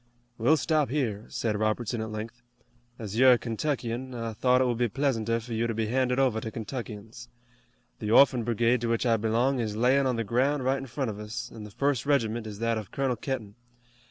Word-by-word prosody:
"We'll 145 +8 +4
stop 155 -3 +1
here," 115 -7 -2
said 110 -2 -1
Robertson 110 +2 -1
at 110 - -4
length. 110 +3 -7 0.6
"As 110 0 -4
you're 130 0 +8
a - - +3
Kentuckian, 125 +1 -3
I 115 -1 -4
thought 125 +4 +3
it 130 - +3
would 120 -2 -1
be 120 - +3
pleasanter 115 -2 0
for 115 +1 -7
you 115 +1 0
to 115 - -3
be 110 0 0
handed 125 +2 +1
over 125 -5 +2
to 110 - -4
Kentuckians. 115 0 -7 0.7
The 105 - -3
Orphan 125 +1 +5
Brigade 120 +1 +1
to 120 - -1
which 115 +2 0
I 115 -2 +3
belong 115 +5 +1
is 110 -3 -2
layin' 130 +4 +3
on 125 - +1
the 115 - -1
ground 130 +5 +1
right 135 +1 +2
in 135 - -7
front 130 -1 -2
of 105 - -9
us, 120 +3 -6
an' 110 -2 -8
the - - -9
first 135 +4 -1
regiment 115 -5 +1
is 105 -2 -7
that 115 0 0
of 105 -3 -9
Colonel 135 -2 -1
Kenton. 115 -4 -4
120 Hz, 215 wpm, -28 LUFS, 110-130 Hz, 0.7 s, you're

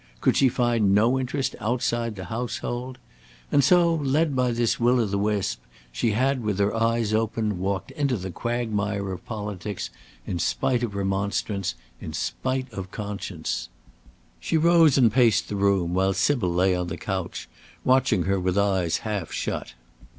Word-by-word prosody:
could - - +2
she 135 - +5
find 115 -5 +2
no 120 +5 +3
interest 130 +1 -2
outside 120 0 -1
the 95 -1 -7
household? 120 +2 -4 0.5
And 140 - +4
so, 170 +3 +5
led 150 0 +1
by 125 -1 +2
this 115 -1 0
will 125 +1 +3
of 110 -4 0
the 100 - 0
wisp, 100 - -1 0.3
she 105 - 0
had, 130 +3 +1
with 105 -3 -1
her 100 0 +1
eyes 115 -1 +1
open, 110 -3 0
walked 95 -1 -2
into 140 -5 0
the 95 -1 -5
quagmire 105 -3 -2
of 90 - -6
politics, 105 - -5 0.3
in 85 - -3
spite 120 +9 +1
of 115 -4 -3
remonstrance, 100 -1 -1 0.2
in - - -7
spite 130 -1 -2
of 95 -2 -6
conscience. 100 -5 -4 0.7
She 165 - 0
rose 165 -3 +5
and 120 -5 +4
paced 120 -5 +3
the 105 - -3
room, 100 -3 +1
while 95 +1 +2
Sybil 95 0 +1
lay 90 +2 +3
on 90 0 -2
the 85 0 -5
couch, 95 -2 -4 0.4
watching 130 -7 +3
her 95 +1 +1
with 90 +1 0
eyes 95 -5 +1
half 100 -6 -3
shut. - - -4
105 Hz, 165 wpm, -25 LUFS, 95-125 Hz, 0.7 s, she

